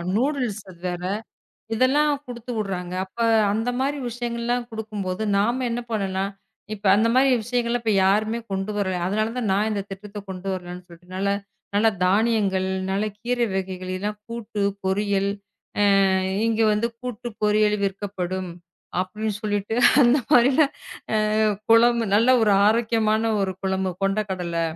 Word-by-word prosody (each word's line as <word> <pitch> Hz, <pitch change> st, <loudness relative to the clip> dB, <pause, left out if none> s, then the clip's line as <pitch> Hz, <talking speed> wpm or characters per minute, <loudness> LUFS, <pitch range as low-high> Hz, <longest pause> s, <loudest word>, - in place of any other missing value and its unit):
Noodles 250 Hz, -4 st, 0 dB
அது 175 Hz, -2 st, -14 dB
வேற. 175 Hz, 0 st, -5 dB, 0.7 s
இதெல்லாம் 285 Hz, +6 st, +3 dB
குடுத்துடுறாங்க. 215 Hz, -7 st, -4 dB
அப்ப 190 Hz, -, -30 dB, 0.4 s
அந்த 225 Hz, +3 st, -1 dB
மாரி 280 Hz, +2 st, 0 dB
விஷயங்கள் 235 Hz, 0 st, -4 dB
எல்லாம் 240 Hz, 0 st, -1 dB
கொடுக்கும்போது 215 Hz, -3 st, -4 dB
நாம 235 Hz, +6 st, +1 dB
என்ன 240 Hz, +1 st, -2 dB
பண்ணனும்னா, 195 Hz, -3 st, -1 dB, 0.5 s
இப்ப 210 Hz, -1 st, -10 dB
அந்த 220 Hz, +3 st, +3 dB
மாரி 270 Hz, +1 st, +5 dB
விஷயங்களை 240 Hz, +1 st, 0 dB, 0.3 s
யாருமே 215 Hz, +4 st, +2 dB
கொண்டு 195 Hz, +2 st, -2 dB
வரல. 190 Hz, -2 st, 0 dB
அதனால 215 Hz, +3 st, 0 dB
தான் 235 Hz, -5 st, -1 dB
நான் 205 Hz, +3 st, +1 dB
இந்தத் 200 Hz, -1 st, -4 dB
திட்டத்தைக் 200 Hz, +1 st, -8 dB
கொண்டு 190 Hz, 0 st, -6 dB
வரலாம்னு 180 Hz, -1 st, -7 dB
சொல்லிட்டுனால 185 Hz, +3 st, -5 dB, 0.4 s
நல்லா 210 Hz, +2 st, +4 dB, 0.2 s
தானியங்கள், 200 Hz, -1 st, +2 dB, 0.2 s
நல்ல 200 Hz, +2 st, 0 dB
கீரை 240 Hz, +2 st, 0 dB
வகைகள் 185 Hz, -1 st, -4 dB
இல்லன்னா 205 Hz, +3 st, -2 dB, 0.2 s
கூட்டு, 230 Hz, -2 st, -5 dB, 0.2 s
பொரியல். 200 Hz, +1 st, +1 dB, 0.8 s
அ -, -, +3 dB, 0.4 s
இங்க 225 Hz, 0 st, +1 dB
வந்து 210 Hz, +2 st, +1 dB
கூட்டு 245 Hz, -1 st, -5 dB
பொரியல் 210 Hz, 0 st, +3 dB
விற்கப்படும். 190 Hz, -2 st, -3 dB, 0.5 s
அப்படின்னு 210 Hz, +3 st, -3 dB
சொல்லிட்டு 205 Hz, 0 st, -2 dB, 0.3 s
அந்த 250 Hz, +3 st, +5 dB
மாரி 245 Hz, +2 st, +6 dB, 1.2 s
குழம்பு 235 Hz, +1 st, +5 dB
நல்ல 220 Hz, +4 st, +4 dB
ஒரு 215 Hz, -, +4 dB, 0.2 s
ஆரோக்கியமான 220 Hz, -1 st, +2 dB, 0.2 s
ஒரு 190 Hz, -1 st, 0 dB
குழம்பு 190 Hz, -1 st, 0 dB
கொண்ட 195 Hz, +2 st, +1 dB
கடலை. 170 Hz, -3 st, -2 dB
210 Hz, 135 wpm, -23 LUFS, 190-235 Hz, 1.2 s, மாரி